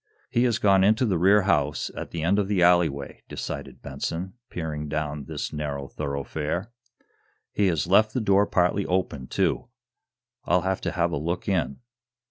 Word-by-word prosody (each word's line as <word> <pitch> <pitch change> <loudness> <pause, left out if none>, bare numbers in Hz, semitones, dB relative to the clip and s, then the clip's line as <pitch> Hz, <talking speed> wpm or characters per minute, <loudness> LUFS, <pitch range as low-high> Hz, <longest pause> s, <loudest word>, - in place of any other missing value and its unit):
"He 120 +1 +3
has 120 -3 +2
gone 95 -2 +4
into 110 +5 +4
the 95 -7 +1
rear 100 +3 +5
house, 75 -6 +1
at - - -6
the 80 -2 -4
end 95 +5 +3
of 100 - 0
the 95 -3 +2
alleyway," 85 -6 +2
decided - - -6
Benson, 80 +7 -4 0.2
peering 75 -3 -4
down 75 -1 -3
this - - -5
narrow 70 -2 -4
thoroughfare. 75 +8 -3 0.8
"He 100 - +2
has 80 -6 +1
left 110 +4 +4
the - - +2
door 100 -2 +3
partly 90 +3 +1
open, 90 -8 -1
too. - - 0 0.8
I'll 90 +2 +2
have 95 +1 -1
to - - -2
have 85 -1 +1
a - - -1
look 85 +4 -3
in." 85 - -1
85 Hz, 170 wpm, -25 LUFS, 75-100 Hz, 0.8 s, rear